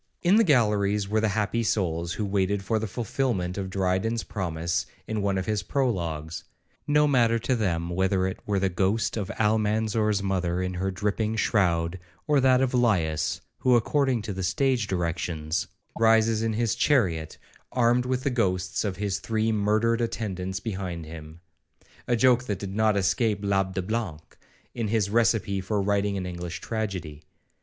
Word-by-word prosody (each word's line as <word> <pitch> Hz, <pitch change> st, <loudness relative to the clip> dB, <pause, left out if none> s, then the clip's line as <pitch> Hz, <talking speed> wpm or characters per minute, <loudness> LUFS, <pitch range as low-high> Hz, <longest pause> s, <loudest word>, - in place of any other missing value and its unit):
1 175 Hz, -, +3 dB
In -, -, +7 dB
the 225 Hz, -, +6 dB
galleries 105 Hz, -, +2 dB
were 110 Hz, +2 st, +1 dB
the 110 Hz, -, +2 dB
happy 110 Hz, +2 st, 0 dB
souls 85 Hz, -6 st, -1 dB
who 105 Hz, -, -2 dB
waited 100 Hz, 0 st, 0 dB
for 110 Hz, +3 st, 0 dB
the 110 Hz, -, -3 dB
fulfilment 105 Hz, -4 st, -2 dB
of 95 Hz, -2 st, -4 dB
Dryden's 95 Hz, +4 st, 0 dB
promise 85 Hz, -2 st, -2 dB, 0.2 s
in 110 Hz, -1 st, -2 dB
one 100 Hz, -1 st, 0 dB
of 95 Hz, -, -2 dB
his 105 Hz, -2 st, 0 dB
prologues;2 85 Hz, -, -2 dB, 0.4 s
no 150 Hz, 0 st, +4 dB
matter 120 Hz, -5 st, +3 dB
to 120 Hz, +3 st, 0 dB
them 85 Hz, -7 st, -1 dB
whether 95 Hz, +1 st, +1 dB
it 95 Hz, -, -3 dB
were 100 Hz, -1 st, +1 dB
the 95 Hz, 0 st, +2 dB
ghost 95 Hz, +5 st, 0 dB
of 105 Hz, -3 st, -3 dB
Almanzor's 110 Hz, -1 st, +1 dB
mother 90 Hz, -2 st, 0 dB
in 90 Hz, 0 st, -2 dB
her 95 Hz, +2 st, -2 dB
dripping 105 Hz, +3 st, -1 dB
shroud, 90 Hz, -5 st, +1 dB, 0.3 s
or 150 Hz, -2 st, +3 dB
that 130 Hz, -1 st, +4 dB
of 130 Hz, -1 st, +1 dB
Laius, 90 Hz, -, +1 dB, 0.2 s
who, 125 Hz, -1 st, +4 dB
according 130 Hz, 0 st, +1 dB
to 105 Hz, -1 st, -4 dB
the 95 Hz, -, -4 dB
stage 120 Hz, +4 st, +1 dB
directions, 85 Hz, -1 st, -2 dB, 0.3 s
rises 110 Hz, 0 st, +4 dB
in 115 Hz, 0 st, 0 dB
his 115 Hz, -1 st, +1 dB
chariot, 85 Hz, -, +1 dB, 0.3 s
armed 125 Hz, 0 st, +2 dB
with 130 Hz, 0 st, -1 dB
the 140 Hz, -, 0 dB
ghosts 95 Hz, -6 st, 0 dB
of 100 Hz, -4 st, -2 dB
his 100 Hz, -2 st, -1 dB
three 110 Hz, +1 st, 0 dB
murdered 110 Hz, +2 st, +1 dB
attendants 95 Hz, -5 st, -3 dB
behind 95 Hz, -6 st, -4 dB
him;—a 80 Hz, +7 st, -8 dB
joke 125 Hz, +1 st, +4 dB
that 105 Hz, -5 st, -2 dB
did 95 Hz, 0 st, -6 dB
not 110 Hz, -1 st, +3 dB
escape 105 Hz, +2 st, +1 dB
l'Abbe 95 Hz, -1 st, +1 dB
le -, -, -2 dB
Blanc3, 110 Hz, -9 st, -2 dB, 0.5 s
in 115 Hz, -3 st, -2 dB
his 105 Hz, -2 st, 0 dB
recipe 110 Hz, -4 st, +2 dB
for 105 Hz, +2 st, -1 dB
writing 100 Hz, 0 st, 0 dB
an 95 Hz, -, -3 dB
English 85 Hz, -1 st, -5 dB
tragedy. 95 Hz, -10 st, -4 dB
100 Hz, 170 wpm, -26 LUFS, 95-115 Hz, 0.5 s, In